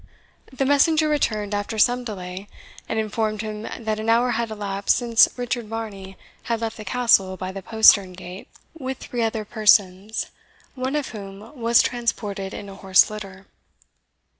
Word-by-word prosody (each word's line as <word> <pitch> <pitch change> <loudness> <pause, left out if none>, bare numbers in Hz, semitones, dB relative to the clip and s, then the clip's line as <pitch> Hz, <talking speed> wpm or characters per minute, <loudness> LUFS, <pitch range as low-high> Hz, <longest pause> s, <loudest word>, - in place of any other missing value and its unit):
The 265 +1 -1
messenger 305 +3 +3
returned 215 -9 0
after 205 +2 -3
some 245 +3 +3
delay, 190 -3 -7 0.4
and 225 - -2
informed 215 0 -1
him 215 -1 -5 0.2
that 215 -1 -1
an 220 +1 -2
hour 240 +2 +3
had 235 0 -1
elapsed 200 -2 0
since 235 -2 +2
Sir - - -10
Richard 245 -2 -3
Varney 205 -4 -7 0.3
had 230 -1 -1
left 225 -1 -3
the 215 - -7
Castle 195 -4 +2
by 185 +1 -5
the 195 0 -7
postern 200 -2 +5
gate 180 +1 -10 0.3
with 265 -5 -5
three 245 -2 -5
other 220 -1 -1
persons, 205 -1 +2 0.4
one 260 +1 -3
of 295 -2 -2
whom 200 +3 -10
was 235 -2 +4
transported 210 -5 -2
in 200 - -8
a 195 - -9
horse 190 +1 +4
litter. 195 -2 -9
215 Hz, 165 wpm, -23 LUFS, 195-240 Hz, 0.4 s, postern